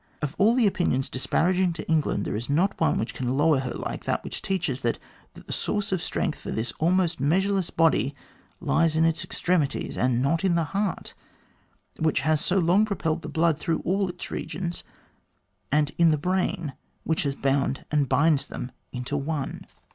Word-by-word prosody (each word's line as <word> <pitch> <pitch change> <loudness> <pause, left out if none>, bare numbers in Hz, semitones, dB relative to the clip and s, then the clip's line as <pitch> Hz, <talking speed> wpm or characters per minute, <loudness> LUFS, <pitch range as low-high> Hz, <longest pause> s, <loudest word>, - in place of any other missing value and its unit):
Of 150 0 -2
all 220 +4 +5
the 250 -3 +4
opinions 170 -9 +1
disparaging 180 +7 +1
to 165 - -7
England, 155 -10 +1
there - - -2
is 115 +5 -4
not 170 +7 +1
one 160 - +3
which 115 - -2
can 130 +1 -2
lower 150 -1 +4
her 130 -1 -3
like - - -5
that - - -1
which - - -6
teaches 175 -9 -1
that 120 -2 0 0.4
the - - -7
source 205 0 -2
of 185 -3 0
strength - - -2
for - - -8
this 110 +2 -2
almost 175 0 +2
measureless 190 +6 +1
body 160 -4 +2 0.4
lies 165 -1 +2
in 160 +1 +4
its 165 +1 +1
extremities, 170 -6 -1
and 125 -1 +2
not 150 +7 +1
in 185 -3 +3
the 170 - +2
heart 200 -1 -2 0.9
which 155 -4 +2
has 155 +1 +2
so 180 +3 +1
long 180 +3 +4
propelled 170 -6 -1
the 155 - -6
blood 160 0 +2
through 165 +1 -1
all 195 +1 +1
its 175 0 -7
regions* 170 +2 -4 0.9
and 150 0 +2
in 170 -1 +6
the 155 - +3
brain 175 -2 -1 0.3
which 160 - 0
has 140 -1 -1
bound 135 0 0
and 145 -3 +2
binds 145 +2 +3
them 125 - -6 0.2
into 125 +3 -4
one. 145 -1 -3
160 Hz, 185 wpm, -26 LUFS, 140-180 Hz, 0.9 s, in